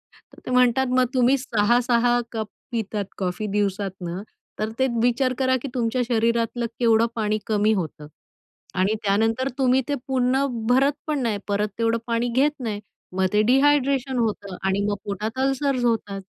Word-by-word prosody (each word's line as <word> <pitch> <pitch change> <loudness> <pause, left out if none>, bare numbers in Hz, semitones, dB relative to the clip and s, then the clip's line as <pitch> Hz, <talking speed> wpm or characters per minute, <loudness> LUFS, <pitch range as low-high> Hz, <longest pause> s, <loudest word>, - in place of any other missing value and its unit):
तर - - -20
ते - - -4
म्हणतात, 250 +1 +3
"मग 255 - +4
तुम्ही 255 +1 +4
6-6 240 0 +2
कप 220 -2 -3 0.2
पितात 215 -3 -2
कॉफी 185 +2 -2
दिवसातनं, 195 -3 -2 0.4
तर 215 +1 -1
ते 265 - +3
विचार 245 +2 +2
करा 260 0 +3
की 280 - -4
तुमच्या 245 0 0
शरीरातलं 235 0 +1
केवढं 230 -1 +4
पाणी 215 -1 0
कमी 215 0 +2
होतं 155 -6 -4 0.7
आणि 190 +3 +2
त्यानंतर 225 +6 +1
तुम्ही 260 -1 +3
ते 290 - 0
पुन्हा 265 +1 +2 0.2
भरत 270 +3 +4
पण 300 -2 0
नाही, 225 -3 0
परत 205 +1 0
तेवढं 230 0 +2
पाणी 235 +1 0
घेत 280 +4 +3
नाही, 220 -5 -3 0.4
मग 190 - +3
ते 210 - +4
डिहायड्रेशन 270 -1 +3
होतं 200 -4 -2
आणि 190 +1 +1
मग 205 - 0
पोटात 210 +4 -4
अल्सर्स 270 -1 0
होतात." 205 -4 -1
230 Hz, 160 wpm, -23 LUFS, 210-255 Hz, 0.7 s, मग